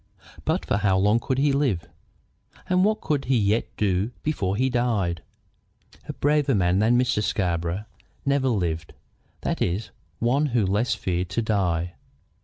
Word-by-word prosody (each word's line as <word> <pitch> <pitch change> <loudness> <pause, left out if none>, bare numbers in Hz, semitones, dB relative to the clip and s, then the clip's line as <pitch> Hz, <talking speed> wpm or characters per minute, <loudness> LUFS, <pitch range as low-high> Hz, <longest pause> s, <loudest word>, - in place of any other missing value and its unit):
But - - 0
for - - +1
how 100 -2 +2
long 105 +4 +3
could 130 +2 -2
he 140 +1 +3
live? 125 - 0 0.8
And 185 0 +3
what 215 +1 +2
could 145 -3 -1
he 130 -1 +2
yet 105 +1 +1
do 100 +1 +1
before 100 -11 -1
he 130 +5 +2
died? 115 -9 0 0.9
A - - -2
braver 145 -2 +2
man 90 -1 +2
than 115 +3 +4
Mr. 125 -4 +1
Scarborough 90 -1 -1 0.4
never 140 -1 +2
lived, 85 -8 -2 0.5
that - - -2
is, 95 +5 -1 0.3
one 135 +6 +2
who 110 - +3
less 105 +6 +1
feared 90 -1 -2
to 115 +6 -1
die. 90 -5 0
105 Hz, 155 wpm, -25 LUFS, 90-130 Hz, 0.9 s, than